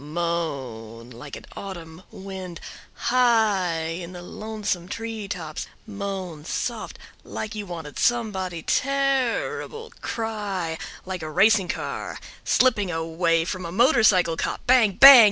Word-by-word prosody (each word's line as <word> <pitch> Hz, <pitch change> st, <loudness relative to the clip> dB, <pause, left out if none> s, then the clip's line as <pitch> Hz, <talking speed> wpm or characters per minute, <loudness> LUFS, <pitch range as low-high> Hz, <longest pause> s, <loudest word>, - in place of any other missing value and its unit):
Moan 135 Hz, -9 st, -3 dB
like 125 Hz, +4 st, -9 dB
an -, -, -10 dB
autumn 170 Hz, -4 st, -8 dB
wind 190 Hz, -2 st, -7 dB, 0.5 s
high 215 Hz, -9 st, +3 dB
in 170 Hz, +2 st, -5 dB
the 175 Hz, -1 st, -8 dB
lonesome 210 Hz, -3 st, -4 dB
tree 225 Hz, 0 st, -5 dB
tops, 165 Hz, -6 st, -5 dB, 0.2 s
moan 195 Hz, -6 st, -5 dB
soft 165 Hz, -, -3 dB, 0.3 s
like 215 Hz, 0 st, -5 dB
you 210 Hz, -2 st, -5 dB
wanted 165 Hz, -4 st, -7 dB
somebody 190 Hz, -8 st, 0 dB
terrible, 275 Hz, -, 0 dB
cry 205 Hz, -7 st, -3 dB, 0.3 s
like 185 Hz, -1 st, -4 dB
a 155 Hz, -, -5 dB
racing 200 Hz, +4 st, +4 dB
car -, -, -4 dB, 0.3 s
slipping 210 Hz, -7 st, +3 dB
away 165 Hz, 0 st, +1 dB
from 185 Hz, +1 st, -4 dB
a 170 Hz, -, -5 dB
motorcycle 215 Hz, -, +4 dB
cop, -, -, -3 dB
bang 245 Hz, -5 st, +5 dB
bang! 275 Hz, +8 st, +12 dB
185 Hz, 120 wpm, -24 LUFS, 165-220 Hz, 0.5 s, bang